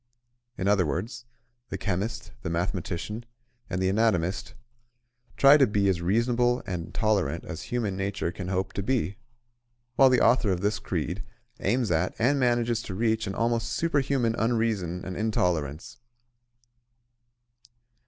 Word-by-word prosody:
In 95 Hz, -, -1 dB
other 100 Hz, -2 st, +4 dB
words, 110 Hz, -, -4 dB, 0.4 s
the -, -, -3 dB
chemist, 110 Hz, +5 st, -3 dB
the 85 Hz, -, -4 dB
mathematician 90 Hz, +5 st, -3 dB, 0.5 s
and 90 Hz, -, -2 dB
the 95 Hz, -, +1 dB
anatomist 95 Hz, -3 st, +1 dB, 0.8 s
try 140 Hz, +2 st, +8 dB
to 135 Hz, -, +5 dB
be 100 Hz, -1 st, +1 dB
as 90 Hz, -3 st, 0 dB
reasonable 120 Hz, +6 st, +2 dB
and 90 Hz, -2 st, -4 dB
tolerant 105 Hz, -5 st, 0 dB
as -, -, -6 dB
human 110 Hz, -6 st, -1 dB
nature 100 Hz, -3 st, -2 dB
can 90 Hz, 0 st, -6 dB
hope 95 Hz, 0 st, -2 dB
to -, -, -2 dB
be; 100 Hz, -4 st, -1 dB, 0.8 s
while 135 Hz, -1 st, +7 dB
the 125 Hz, -1 st, +4 dB
author 120 Hz, -2 st, +4 dB
of 90 Hz, -1 st, -1 dB
this 105 Hz, 0 st, 0 dB
creed 90 Hz, +2 st, -3 dB, 0.4 s
aims 120 Hz, -5 st, +1 dB
at 85 Hz, +2 st, +1 dB
and 135 Hz, +5 st, +2 dB
manages 120 Hz, -2 st, +1 dB
to 95 Hz, -, -6 dB
reach 110 Hz, 0 st, 0 dB
an 95 Hz, -, -4 dB
almost 115 Hz, 0 st, 0 dB
superhuman 135 Hz, -5 st, +1 dB
unreason 110 Hz, -7 st, 0 dB
and 95 Hz, -, -5 dB
intolerance. 90 Hz, -, -1 dB
105 Hz, 140 wpm, -27 LUFS, 90-120 Hz, 0.8 s, try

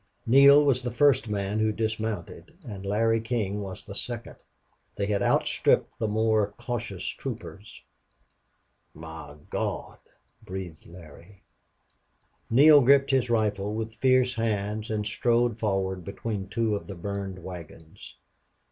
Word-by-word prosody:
Neale 140 Hz, +4 st, +7 dB
was 130 Hz, -3 st, +2 dB
the 125 Hz, -, -3 dB
first 120 Hz, -1 st, +3 dB
man 100 Hz, 0 st, -2 dB
who 110 Hz, 0 st, +2 dB
dismounted, 110 Hz, +7 st, -4 dB
and 100 Hz, -4 st, -7 dB
Larry 115 Hz, +2 st, +2 dB
King 110 Hz, -3 st, -2 dB
was 95 Hz, -1 st, -7 dB
the 100 Hz, -, -8 dB
second. 120 Hz, +3 st, -6 dB, 0.6 s
They 100 Hz, -, -1 dB
had 100 Hz, 0 st, 0 dB
outstripped -, -, +1 dB
the 110 Hz, -, 0 dB
more 110 Hz, -1 st, +1 dB
cautious 120 Hz, -6 st, -5 dB
troopers. 110 Hz, -4 st, -7 dB, 1.1 s
"My 80 Hz, -2 st, -10 dB
Gawd!" -, -, -3 dB, 0.4 s
breathed 90 Hz, -4 st, -8 dB
Larry. 85 Hz, +3 st, -15 dB, 1.1 s
Neale 145 Hz, +5 st, +7 dB
gripped 135 Hz, +2 st, +4 dB
his 130 Hz, -2 st, +2 dB
rifle 105 Hz, -2 st, 0 dB
with 110 Hz, 0 st, -4 dB
fierce 130 Hz, 0 st, +3 dB
hands 110 Hz, -2 st, -2 dB
and 105 Hz, -1 st, -2 dB
strode 115 Hz, +2 st, +1 dB
forward 95 Hz, -3 st, -1 dB
between 100 Hz, 0 st, -5 dB
two 110 Hz, 0 st, 0 dB
of 100 Hz, -, -6 dB
the 100 Hz, -, -7 dB
burned 100 Hz, +1 st, -5 dB
wagons. 85 Hz, -2 st, -11 dB
110 Hz, 130 wpm, -27 LUFS, 100-120 Hz, 1.1 s, Neale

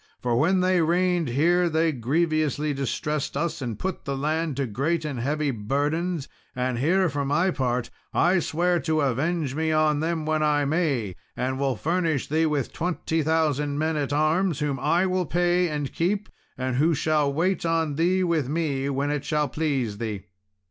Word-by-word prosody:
For 120 Hz, -1 st, 0 dB
when 180 Hz, +9 st, +3 dB
they 185 Hz, -1 st, +3 dB
reigned 175 Hz, +1 st, +2 dB
here 170 Hz, +8 st, +2 dB
they 160 Hz, 0 st, +2 dB
grievously 150 Hz, +2 st, 0 dB
distressed 140 Hz, +2 st, -2 dB
us, 165 Hz, 0 st, -2 dB
and 120 Hz, -5 st, -4 dB
put 190 Hz, +5 st, -4 dB
the 140 Hz, -1 st, -3 dB
land 155 Hz, 0 st, -1 dB
to 140 Hz, -, 0 dB
great 150 Hz, +9 st, -1 dB
and 140 Hz, -5 st, -3 dB
heavy 145 Hz, +3 st, 0 dB
burdens; 145 Hz, -, -1 dB, 0.3 s
and 125 Hz, -1 st, -1 dB
here, 180 Hz, +7 st, +3 dB
for 145 Hz, -3 st, -2 dB
my 150 Hz, +7 st, +2 dB
part, 125 Hz, -4 st, -1 dB, 0.2 s
I 175 Hz, +2 st, +3 dB
swear 175 Hz, +2 st, +1 dB
to 160 Hz, -2 st, 0 dB
avenge 145 Hz, +2 st, 0 dB
me 160 Hz, +2 st, 0 dB
on 155 Hz, -1 st, +2 dB
them 160 Hz, 0 st, -1 dB
when 155 Hz, 0 st, 0 dB
I 150 Hz, -1 st, +2 dB
may, 140 Hz, -, 0 dB, 0.2 s
and 130 Hz, +1 st, -1 dB
will 135 Hz, -2 st, +1 dB
furnish 165 Hz, +1 st, 0 dB
thee 160 Hz, +2 st, +2 dB
with 145 Hz, -4 st, -1 dB
twenty 165 Hz, -1 st, -1 dB
thousand 150 Hz, -2 st, +1 dB
men 160 Hz, +1 st, 0 dB
at 145 Hz, -2 st, -1 dB
arms, 155 Hz, +3 st, +2 dB
whom 145 Hz, -2 st, -1 dB
I 175 Hz, +7 st, +2 dB
will 185 Hz, -2 st, 0 dB
pay 175 Hz, +2 st, +2 dB
and 145 Hz, -3 st, -3 dB
keep, 200 Hz, +5 st, -1 dB, 0.3 s
and 130 Hz, -1 st, -2 dB
who 160 Hz, +4 st, +3 dB
shall 150 Hz, -1 st, +1 dB
wait 175 Hz, +5 st, 0 dB
on 165 Hz, -2 st, 0 dB
thee 180 Hz, +5 st, +2 dB
with 165 Hz, -7 st, 0 dB
me, 145 Hz, -4 st, -1 dB
when 140 Hz, +1 st, -1 dB
it 145 Hz, -1 st, -2 dB
shall 150 Hz, -2 st, 0 dB
please 130 Hz, -9 st, -1 dB
thee." 105 Hz, -4 st, -4 dB
155 Hz, 180 wpm, -25 LUFS, 140-170 Hz, 0.3 s, when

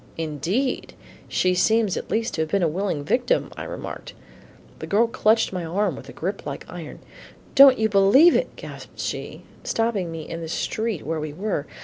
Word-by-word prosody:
"Indeed! 165 Hz, -, -2 dB, 0.3 s
she 185 Hz, 0 st, +1 dB
seems 220 Hz, +2 st, +2 dB
at -, -, -5 dB
least 225 Hz, +1 st, -1 dB
to 160 Hz, -, -1 dB
have 160 Hz, -, -2 dB
been 195 Hz, +2 st, +1 dB
a -, -, +4 dB
willing 170 Hz, -2 st, -2 dB
victim," 245 Hz, -, +1 dB
I -, -, -6 dB
remarked. -, -, -7 dB, 0.7 s
The -, -, -6 dB
woman 230 Hz, +3 st, +2 dB
clutched 220 Hz, -2 st, +2 dB
my 180 Hz, -2 st, -3 dB
arm 180 Hz, +1 st, 0 dB
with 135 Hz, 0 st, -11 dB
a -, -, -7 dB
grip 195 Hz, +4 st, -4 dB
like 140 Hz, -1 st, -6 dB
iron. 170 Hz, -4 st, -9 dB, 0.5 s
"Don't 275 Hz, -2 st, +8 dB
you 220 Hz, -, +2 dB
believe 215 Hz, -, +6 dB
it," -, -, 0 dB
gasped -, -, -11 dB
she, -, -, -5 dB, 0.2 s
stopping 220 Hz, -7 st, -1 dB
me 160 Hz, -1 st, -7 dB
in 165 Hz, -, -6 dB
the 165 Hz, -, -6 dB
street 220 Hz, +2 st, -2 dB
where 160 Hz, +1 st, -2 dB
we 150 Hz, -1 st, -5 dB
were. 180 Hz, -4 st, -3 dB
190 Hz, 190 wpm, -24 LUFS, 160-225 Hz, 0.7 s, Don't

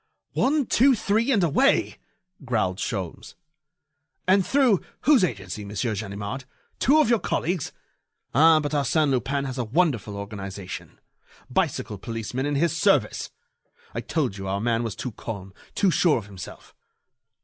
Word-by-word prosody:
one, 285 Hz, +1 st, +2 dB
two, 260 Hz, +4 st, +4 dB
three 220 Hz, +4 st, +1 dB
and 205 Hz, -7 st, +3 dB
away!" 260 Hz, -, +2 dB, 0.5 s
growled 110 Hz, -7 st, 0 dB
Sholmes. 100 Hz, -1 st, -4 dB, 0.9 s
"And 190 Hz, +1 st, +5 dB
through 255 Hz, -5 st, +3 dB, 0.2 s
whose 275 Hz, -6 st, +5 dB
agency, 100 Hz, -, -3 dB
Monsieur 105 Hz, +3 st, -2 dB
Ganimard? 100 Hz, +5 st, -5 dB, 0.3 s
Two 290 Hz, +5 st, +5 dB
of -, -, +2 dB
your 235 Hz, -1 st, +3 dB
colleagues.... 175 Hz, -4 st, -1 dB, 0.6 s
Ah! 160 Hz, +4 st, +6 dB
but 145 Hz, -1 st, -3 dB
Arsène 145 Hz, +1 st, +2 dB
Lupin 135 Hz, +2 st, 0 dB
has 130 Hz, -1 st, -4 dB
a -, -, +1 dB
wonderful 120 Hz, -, 0 dB
organization! 100 Hz, -2 st, -7 dB, 0.5 s
Bicycle 105 Hz, -, -1 dB
policemen 115 Hz, +5 st, -3 dB
in 145 Hz, -, -1 dB
his 170 Hz, +4 st, +1 dB
service!... 165 Hz, -, +2 dB, 0.6 s
I -, -, -3 dB
told 100 Hz, -, -2 dB
you 95 Hz, -, -5 dB
our 100 Hz, +1 st, -1 dB
man 115 Hz, +1 st, +1 dB
was 115 Hz, -3 st, -3 dB
too 125 Hz, -, -5 dB
calm, 100 Hz, -3 st, -7 dB, 0.2 s
too 195 Hz, -3 st, +3 dB
sure 165 Hz, -4 st, +3 dB
of 110 Hz, -, -5 dB
himself." 95 Hz, -4 st, -11 dB
130 Hz, 145 wpm, -25 LUFS, -, 0.9 s, Ah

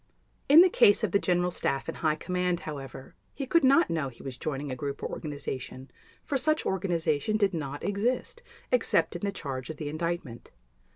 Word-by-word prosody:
In 305 Hz, +4 st, +10 dB
the 370 Hz, -, +7 dB
case 205 Hz, -, +4 dB
of 210 Hz, -, +1 dB
the 200 Hz, -, +3 dB
General 180 Hz, -1 st, +1 dB
Staff 135 Hz, -5 st, -1 dB
and -, -, -5 dB
High 155 Hz, -2 st, +1 dB
Command, 180 Hz, +1 st, -1 dB
however, 135 Hz, -3 st, -8 dB, 0.2 s
he 275 Hz, -, -3 dB
could 335 Hz, +5 st, +3 dB
not 275 Hz, +6 st, +5 dB
know 155 Hz, -5 st, -1 dB
he 120 Hz, -, -15 dB
was 135 Hz, -2 st, -6 dB
joining 140 Hz, +1 st, -4 dB
a -, -, -3 dB
group 140 Hz, +2 st, -5 dB
or -, -, -2 dB
organization 140 Hz, -3 st, -6 dB, 0.3 s
for 275 Hz, -, 0 dB
such 310 Hz, +3 st, +1 dB
organization 175 Hz, 0 st, 0 dB
did 200 Hz, -2 st, +2 dB
not 145 Hz, -3 st, -4 dB
exist 220 Hz, -, -1 dB, 0.3 s
except -, -, +2 dB
in -, -, -5 dB
the 200 Hz, -1 st, -1 dB
charge 135 Hz, -8 st, -5 dB
of 155 Hz, -, -6 dB
the 145 Hz, -1 st, -4 dB
Indictment. 155 Hz, -6 st, -4 dB
170 Hz, 190 wpm, -28 LUFS, 140-205 Hz, 0.3 s, In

